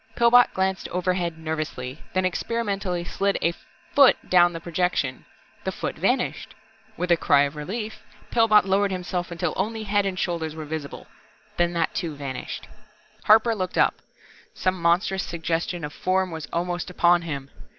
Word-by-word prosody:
Pillbot 240 +1 +6
glanced 190 0 0
overhead 180 -2 -1
nervously, 155 -4 -4 0.2
then 185 0 +2
experimentally 195 -2 -2
slid 195 +3 0
a 170 - +2 0.4
font 275 -3 +5
down 175 -1 +6
the 165 - -6
projection. 170 -6 -1 0.4
The - - -1
foot - - -4
vanished. - - -1 0.4
With 180 +1 -1
a 170 - +6
cry 145 -3 +4
of 145 +1 -2
relief, 210 +9 -5 0.3
Pillbot 225 -3 +5
lowered 195 +1 +2
himself 180 -1 -3
until 170 -1 -2
only 220 +3 -2
head 205 -1 +1
and 185 -1 -3
shoulders 165 -4 -2
were 155 -1 -6
visible. 150 -1 -6 0.5
Then 175 0 +2
that 165 -1 0
too 165 -5 -3
vanished. 135 -3 -6 0.6
Harper 220 +2 +6
looked 185 -4 -3
up. - - +4 0.6
Some 185 -1 -1
monstrous 185 +3 +2
suggestion 170 0 -2
of 150 - -7
Form 185 0 0
was 160 -2 -6
almost 175 +1 -2
upon 175 -1 +4
him. 140 -5 -6
175 Hz, 155 wpm, -24 LUFS, 165-195 Hz, 0.6 s, Pillbot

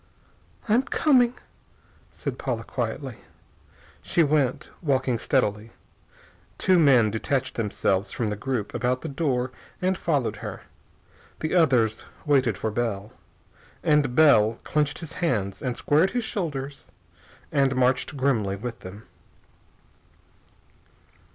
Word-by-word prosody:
"I'm 225 +3 +4
coming," 255 -3 +3 0.8
said - - -5
Paula - - -2
quietly. - - -4 0.8
She 175 -3 +2
went, 145 -4 0
walking 130 -6 +1
steadily. 110 -4 0 0.8
Two 185 -2 +3
men 125 -8 +5
detached 130 +4 -1
themselves 100 -3 -1
from 110 -3 -2
the - - -2
group 115 -1 -3
about 125 +1 0
the - - -5
door 135 -4 -1 0.3
and 185 +1 +1
followed 145 -8 -1
her. - - -7 0.8
The 155 - -2
others 125 -11 +3 0.2
waited 130 -8 +2
for 110 - -2
Bell. 105 -2 -2 0.7
And 145 -5 +2
Bell 115 -8 +5
clenched 150 -1 0
his 165 -1 -8
hands 105 - -1
and 125 -2 -3
squared 155 +6 +3
his 245 - 0
shoulders 145 - -4 0.6
and 135 -3 +2
marched 130 +3 +1
grimly 115 -8 +1
with 115 +3 -6
them. 100 +4 -10
130 Hz, 115 wpm, -25 LUFS, 115-155 Hz, 0.8 s, men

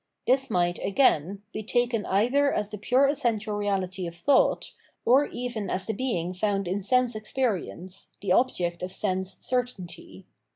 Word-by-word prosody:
This 265 +1 +2
might, 175 -1 +1
again, 200 - +2
be 215 - -3
taken 235 0 0
either 255 +9 +3
as 210 - -2
the 210 - -6
pure 255 +6 +3
essential 225 -6 0
reahty 195 -3 -2
of 170 - -8
thought, 265 +10 +2 0.3
or 265 +5 +5
even 240 -5 -4
as 185 0 -1
the 220 - -2
being 190 -7 -2
found 195 0 -1
in 190 +3 -1
sense 250 +4 +2
experience, 215 -5 -3
the 195 - -2
object 180 -6 +1
of 180 0 -4
sense 190 -1 -2
certainty. 185 - -4
205 Hz, 155 wpm, -27 LUFS, 185-245 Hz, 0.3 s, or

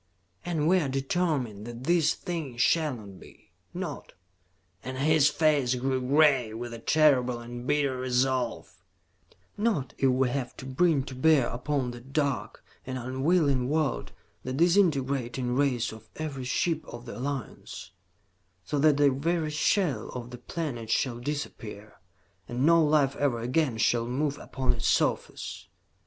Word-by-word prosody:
"And 160 -3 -1
we 185 +2 +5
are 145 -6 -1
determined 135 - -1
that 120 +1 -8
this 165 0 +3
thing 160 -9 -5
shall 155 +2 +2
not 100 -5 -11
be. - - -17 0.2
Not" - - -6 0.7
and 130 0 -5
his 150 +1 +4
face 150 -5 +2
grew 130 +1 -1
gray 135 -4 +3
with 120 +1 -6
a 115 - -7
terrible 130 -3 +3
and 120 +1 -8
bitter 145 -3 +1
resolve 125 -1 -1 0.7
"not 205 - 0
if 135 - +4
we 130 0 +2
have 125 -1 -4
to - - -8
bring 140 +2 +2
to 130 - -8
bear 140 0 +4
upon 125 +1 -2
that 120 +3 -12
dark 140 -3 -1 0.2
and 130 0 -5
unwilling 130 +1 +1
world 155 -2 -1 0.3
the 130 - -4
disintegrating 135 -7 +2
rays 125 -5 +1
of 110 0 -13
every 140 -5 -5
ship 160 +5 0
of 120 0 -9
the 115 - -7
Alliance, 135 -3 -5 0.7
so 145 - -1
that 150 0 +4
the 145 -1 +5
very 155 +3 -1
shell 150 - +1
of 120 -1 -6
the 125 - -8
planet 125 -6 -5
shall 120 +1 0
disappear, 115 -6 -6 0.5
and 125 +3 0
no 165 0 +6
life 145 -2 +3
ever 135 -5 +1
again 125 +1 0
shall 115 +1 +2
move 140 +3 -1
upon 130 -1 -1
its 115 -1 -2
surface. - - -1
135 Hz, 150 wpm, -28 LUFS, 125-150 Hz, 0.7 s, no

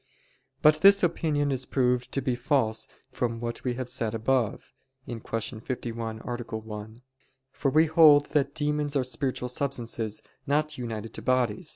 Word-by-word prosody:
But 155 0 +6
this 200 0 +7
opinion 150 -4 +1
is 130 -1 -2
proved 125 -2 +1
to 135 - +1
be 130 - +1
false 120 -4 0 0.2
from 115 -2 -2
what 120 0 -5
we 125 -2 -1
have 130 -1 -4
said 115 -2 -1
above 115 0 -1 0.3
(Q. 115 -2 -6 0.4
51, 115 -2 -5
A. - - -14
1): 110 -2 -6 0.5
for 140 - -1
we 155 +4 +5
hold 155 -2 +6
that 140 -1 +1
demons 150 -1 -1
are 135 - +2
spiritual 125 0 -2
substances 115 -5 -2 0.2
not 150 +2 +1
united 115 -2 -5
to - - -7
bodies. 130 - 0
125 Hz, 155 wpm, -27 LUFS, 115-145 Hz, 0.5 s, this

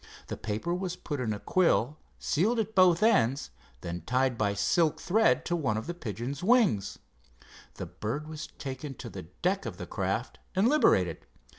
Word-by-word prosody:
The - - -3
paper 110 +10 -3
was 180 0 -3
put 145 -2 -5
in 115 -4 -1
a 105 - -2
quill, 155 - +2 0.2
sealed 210 +10 +1
at 220 -1 -1
both 185 -1 +5
ends, 140 - +3 0.3
and 85 0 -4
then - - -16
tied 125 +6 +1
by 100 -3 0
silk 155 - +2
thread 220 +5 +2
to 175 - 0
one 130 -10 0
of 110 - -4
the 175 - -4
pigeon's 130 - -5
wings. 200 - +3 0.8
The - - -5
bird 140 +9 -4
was 155 0 -6
taken 135 +1 -7
to 120 -2 -8
the 95 - -7 0.2
deck 190 +2 +1
of - - -6
the - - -6
craft - - -3 0.2
and 195 +4 +4
liberated. 95 - +3
150 Hz, 180 wpm, -29 LUFS, 115-185 Hz, 0.8 s, both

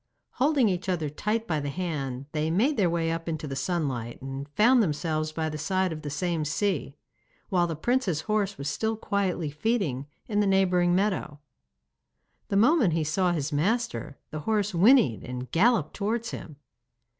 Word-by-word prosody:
Holding 275 -2 +4
each 185 0 -1
other 160 -5 -1
tight 215 +8 -1
by 155 -5 0
the 145 0 -3
hand, 140 -6 -3
they 155 0 -1
made 230 - +2
their 190 -8 +2
way 165 -1 0
up 165 0 -3
into 160 -1 -3
the 135 - -4
sunlight, 135 -6 -2
and 135 +2 -6
found 235 - +4
themselves 155 -3 -1
by 160 0 -2
the 155 -1 -4
side 185 +3 0
of 155 - -7
the 150 - -5
same 165 +2 -1
sea, 155 -2 -1 0.5
while 175 -2 +2
the 165 - -3
prince's 190 - 0
horse 210 -1 -1
was 140 - -5
still 220 +9 -1
quietly 190 -7 -1
feeding 150 - -1 0.2
in 210 -2 0
the 205 - +3
neighbouring 180 -2 +3
meadow. 185 -7 -1 1.1
The 200 - 0
moment 235 - +4
he 160 -1 +1
saw 175 +4 +1
his 155 -3 -2
master, 185 - -1
the 155 - -4
horse 210 +4 0
whinnied 175 - +5
and 125 0 -6
galloped 200 -3 +3
towards 225 +3 -2
him. 155 - -8
175 Hz, 175 wpm, -27 LUFS, 150-205 Hz, 1.1 s, whinnied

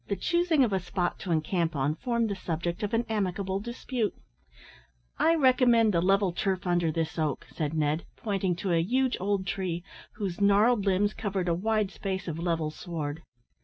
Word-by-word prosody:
The 200 - 0
choosing 345 - +2
of 225 -5 +1
a 190 - +2
spot 180 0 -2
to 180 - -4
encamp 165 +1 0
on 140 +2 +1
formed 235 +3 -1
the - - -1
subject 170 -1 -3
of 210 +1 -1
an 230 +1 +1
amicable 195 -2 -1
dispute. 235 0 -3 1.0
"I 330 - +4
recommend 250 -6 +4
the 170 - +3
level 195 0 +3
turf 190 +1 -1
under 175 -2 +2
this 165 +1 -2
oak," 150 -3 -1
said 155 -1 -2
Ned, 155 +1 0
pointing 195 -5 -1
to 180 +2 -2
a 165 - +3
huge 255 +8 +1
old 195 0 0
tree, 175 -2 -2 0.3
whose 200 -3 -4
gnarled 205 +2 +4
limbs 200 +2 +2
covered 195 -3 -2
a 170 - +2
wide 210 +2 0
space 190 -1 -4
of 165 -1 -3
level 165 -3 -1
sward. 155 -2 -5
190 Hz, 180 wpm, -28 LUFS, 170-215 Hz, 1.0 s, I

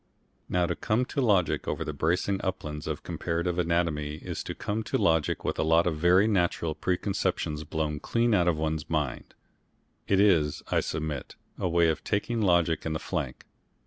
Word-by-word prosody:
Now 90 -1 +2
to 85 0 -1
come 120 +3 0
to 140 - -2
logic 100 - +2
over - - -2
the 75 - -3
bracing 90 +6 0
uplands 75 -5 -4
of - - -4
comparative 85 +1 -2
anatomy 85 -4 0
is 80 - -5
to - - -5
come 105 +2 -2
to - - 0
logic 80 -2 +1
with - - -1
a - - +3
lot 80 +2 +4
of 85 -3 0
very 90 +5 +4
natural 85 -5 +1
preconceptions 90 -4 -1
blown 75 -2 -2
clean 115 +5 +1
out 90 -4 +3
of 85 -3 +2
one's 80 -1 -2
mind. 75 -5 -2 0.7
It 95 - +3
is, 85 -8 +3
I - - +3
submit, 80 -2 -4 0.2
a 90 - 0
way 85 0 +4
of 80 - -2
taking 115 +3 -1
logic 85 -5 +2
in 80 - -2
the 80 - -2
flank. - - -4
85 Hz, 180 wpm, -28 LUFS, 80-95 Hz, 0.7 s, lot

